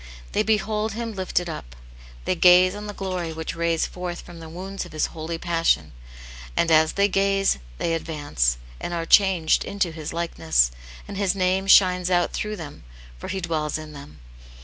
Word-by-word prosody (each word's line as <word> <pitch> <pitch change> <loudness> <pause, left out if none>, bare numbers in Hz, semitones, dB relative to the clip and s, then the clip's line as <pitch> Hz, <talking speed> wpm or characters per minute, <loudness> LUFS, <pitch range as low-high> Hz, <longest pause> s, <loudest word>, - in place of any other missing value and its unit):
They - - +1
behold 215 0 0
Him 230 0 -4
lifted 185 -2 -1
up - - -7 0.2
— - - -19
they - - +1
gaze 180 +1 +6
on 210 +1 -7
the 205 - -5
glory 185 -4 -3
which 160 0 -5
rays 165 -1 +1
forth 180 -1 -6
from 170 -1 -12
the 165 -1 -9
wounds 190 +4 -6
of 175 - -12
His 155 - +1
holy 165 0 -4
pas 165 -1 -2
sion; - - +3 0.7
and 165 - +2
as 160 0 +5
they 200 0 +3
gaze, 195 - +2 0.2
they 165 - -1
advance, 145 - -1 0.2
and 175 - -4
are 165 -1 -2
changed 185 -3 +4
into 195 -4 -1
His 155 -2 -6
likeness, 165 - +1 0.4
and 200 - -7
His 200 -1 +1
name 190 +1 +1
shines 180 -2 +5
out 175 -1 +2
through 215 0 -3
them, 155 - -9 0.4
for - - -7
he 190 - -3
dwells 155 -4 -1
in 155 -1 -9
them. 140 - -11
175 Hz, 190 wpm, -24 LUFS, 160-195 Hz, 0.7 s, gaze